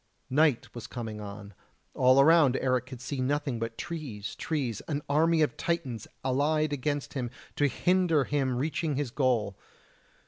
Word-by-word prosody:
Night 145 -2 +2
was 120 - -7
coming 110 -3 -6
on; 100 0 -8 0.4
all 130 +1 +5
around 145 -3 +6
Eric 130 -1 0
could 130 -2 -8
see 130 +2 -4
nothing 140 -2 -1
but 115 0 -4
trees, 125 -12 -5
trees 130 -9 -2
an 145 -2 -2
army 160 +2 +3
of 145 - 0
Titans 135 -11 -2 0.2
allied 145 +3 +1
against 145 +1 -2
him 125 -4 -2 0.3
to 145 - +3
hinder 175 +1 +2
him 135 -2 0
reaching 150 +2 -1
his 140 -3 -2
goal. 120 -7 +1
135 Hz, 150 wpm, -29 LUFS, 120-150 Hz, 0.4 s, around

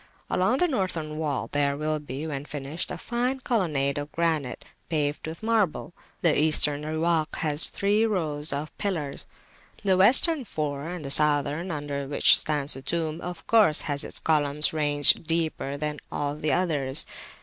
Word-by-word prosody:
Along 205 +8 +1
the 355 - +2
Northern 170 - -3
wall 150 -4 -3
there 140 -1 0
will 155 +1 -1
be, 145 +1 -7
when 145 -3 -5
finished, 150 +3 -4
a - - -5
fine 250 +2 -2
colonnade 150 - 0
of 145 +1 -7
granite, 160 -7 -2 0.2
paved 150 -1 -2
with 160 +5 -8
marble. 215 -7 0 0.3
The 165 -3 +3
Eastern 150 -1 +2
Riwak 160 0 -1
has 150 0 +4
three 210 +3 +1
rows 155 -7 -1
of 145 +2 -5
pillars, 165 -9 -3 0.6
the 190 -2 +2
Western 260 - +5
four, 150 - -4
and 175 -4 -7
the 135 - -3
Southern, 150 +3 +3
under 145 -3 -4
which 145 - +4
stands 150 -1 0
the 135 - -6
tomb, 160 +3 -3
of 175 -2 -7
course 215 -9 +4
has 145 -3 -1
its - - -6
columns 150 -1 +4
ranged 145 0 +3
deeper 160 -4 -2
than 150 0 -4
all 145 0 -3
the 150 0 -2
others. 145 -7 0
155 Hz, 160 wpm, -25 LUFS, 145-175 Hz, 0.6 s, Western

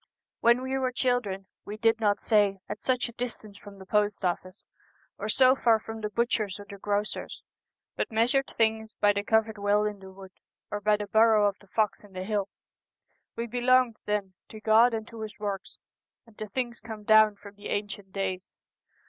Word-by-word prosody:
When 235 +2 +4
we 260 +1 -2
were 255 -1 0
children 245 -7 -1 0.2
we 210 +1 -7
did 225 0 +2
not 205 -2 +1
say 205 -3 +3
at 210 0 -6
such 255 -1 0
a - - -9
distance 220 -4 -6
from 205 -1 -12
the 190 - -12
post 210 -1 0
office, 185 +1 -3 0.5
or 210 - -3
so 255 +3 +6
far 235 -4 +3
from 225 0 -8
the 210 - -2
butcher's 215 -2 -1
or 205 - -9
the 200 -1 -10
grocer's, 205 +1 -3 0.5
but - - -2
measured 245 +5 +2
things 220 -1 0
by 205 0 +3
the 200 0 -2
covered 220 0 +1
well 205 +1 +2
in 210 -1 -3
the 190 0 -11
wood, 190 0 -12 0.4
or 205 - -3
by 210 0 +3
the 210 - -4
burrow 220 0 +4
of 200 -1 -3
the 205 - -20
fox 215 +1 0
in 205 -2 -17
the 185 0 -5
hill. 200 -1 -1 0.9
We 235 - -3
belonged 245 0 +2
then 205 -2 -1
to 220 - -10
God 225 +2 +5
and 220 0 -5
to 230 -1 -10
His 215 -1 -7
works, 200 -2 -5 0.5
and 230 -2 -21
to 215 - -4
things 240 +2 -3
come 220 -1 -9
down 215 0 +6
from 200 0 -13
the 205 0 -9
ancient 205 -1 -4
days. 190 -1 -4
210 Hz, 200 wpm, -28 LUFS, 205-225 Hz, 0.9 s, so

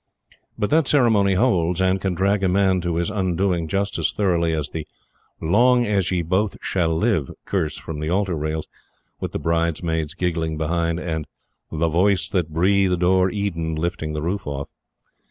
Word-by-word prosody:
But 105 - -1
that 155 -2 +3
ceremony 110 -8 +3
holds 90 -6 +2
and 95 0 +2
can 95 -2 -1
drag 100 +3 +1
a 95 - +3
man 95 -1 +2
to 85 -1 -2
his 85 +4 -1
undoing 95 -3 0
just 100 +4 -1
as - - +1
thoroughly 85 -5 +1
as 75 -3 -2
the 80 -2 -6 0.5
"long 120 +8 +3
as 100 -4 +1
ye 90 -2 0
both 95 +5 0
shall 90 -3 0
live" 100 - +1 0.2
curse 85 -6 -1
from 80 -2 -6
the 75 +1 -3
altar 95 +1 +1
rails, 80 +1 -3 0.5
with - - -4
the - - -2
bridesmaids 85 -1 -1
giggling 80 -4 -1
behind, 85 +1 -1
and 80 -4 -3 0.4
"The 80 +1 0
Voice 95 +4 +2
that 90 -5 0
breathed 90 +2 +2
o'er 95 +1 +4
Eden" 85 -6 -2
lifting 80 -1 -3
the 75 0 -3
roof 100 +3 -3
off. 70 -1 -4
90 Hz, 175 wpm, -22 LUFS, 80-100 Hz, 0.5 s, o'er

